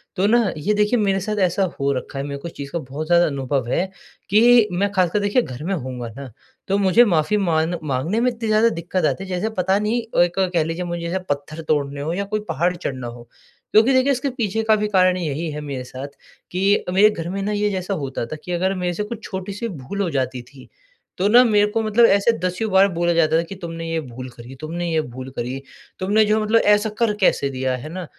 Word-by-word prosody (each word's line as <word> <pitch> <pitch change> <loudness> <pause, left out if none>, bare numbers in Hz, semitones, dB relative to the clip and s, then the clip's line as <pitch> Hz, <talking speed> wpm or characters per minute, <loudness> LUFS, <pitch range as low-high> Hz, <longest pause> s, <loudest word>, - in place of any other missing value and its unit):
तो 195 +2 +2
ना, 225 -3 +3
ये 205 +8 0
देखिए, 210 +3 +2
मेरे 195 -2 +1
साथ 210 +2 -3
ऐसा 180 +3 0 0.2
हो 140 0 +1
रखा 135 +1 -5
है। 135 - -2
मेरे 140 -1 -5
को 170 - -6
इस - - -9
चीज़ 140 -1 -8
का 170 - -2
बहुत 145 +3 -6
ज़्यादा 175 0 +5
अनुभव 135 -3 -2
है 175 - +1 0.4
कि 230 +2 +6
मैं 200 +3 0
खासकर, 185 0 +1
देखिए, 205 +5 +2
घर 130 - -7
में 195 - -1
होऊँगा 125 -7 -5
ना, 140 -3 -8 0.4
तो 195 +1 +1
मुझे 200 +4 +5
माफ़ी 175 +1 +2
मान 170 -3 +1
माँगने 150 - -1
में 250 +1 +2
इतनी 230 -1 -5
ज़्यादा 215 +2 +4
दिक्कत 175 -2 -2
आती 150 +6 0
है, 190 - -9
जैसे 185 +4 -1
पता 190 +2 +2
नहीं, 220 +3 0 0.2
एक 175 +2 -2
कह 170 -2 +3
लीजिए, 165 +3 -3
मुझे 175 0 -4
जैसे 185 +3 -1
पत्थर 145 +3 -3
तोड़ने 140 -2 0
हों 155 +3 -2
या 200 - -1
कोई - - +1
पहाड़ 175 +5 0
चढ़ना 130 -8 -5
हो। 120 0 -10 0.4
क्योंकि 225 +5 +5
देखिए, 260 +2 +3
इसके 270 +2 -1
पीछे 225 -4 -2
का 220 0 +4
भी 210 0 -1
कारण 185 -2 +3
यही 160 -1 -3
है 150 0 -5
मेरे 140 -3 -5
साथ 130 +2 -7 0.4
कि 195 +3 +2
मेरे 205 +3 +6
घर 170 -5 -5
में 195 +2 -3
ना, 205 - -2
ये 210 0 +1
जैसा 190 0 -3
होता 140 -8 -3
था 135 - -6
कि 180 - -6
अगर 185 +2 0
मेरे 180 -1 -1
से 210 - -2
कुछ 225 +1 -7
छोटी-सी 200 +4 -5
भूल 185 - -5
हो 180 - 0
जाती 130 -3 -2
थी, 130 +1 -16 0.5
तो 190 +3 +2
ना 245 +3 +8
मेरे 210 -3 +3
को 225 - 0
मतलब 220 +2 +4
ऐसे 200 +4 +3
दसियों 185 +4 -2
बार 190 +1 +6
बोला 170 0 +1
जाता 160 -1 +3
था - - +3
कि, 180 +4 -9
"तुमने 165 -2 -6
ये 165 0 -1
भूल 130 -1 -8
करी, 120 +2 -12
तुमने 170 +3 -3
ये 160 -1 +2
भूल 130 -1 -8
करी। 125 +3 -4 0.4
तुमने 205 +4 +3
जो 215 +1 +2
है, 215 - 0
मतलब 225 +2 +3 0.2
ऐसा 210 +1 -1
कर 230 -3 +2
कैसे 140 -6 +3
दिया?" 130 -1 -1
है 155 - -7
ना? 180 +1 -6
180 Hz, 245 wpm, -21 LUFS, 145-210 Hz, 0.5 s, ना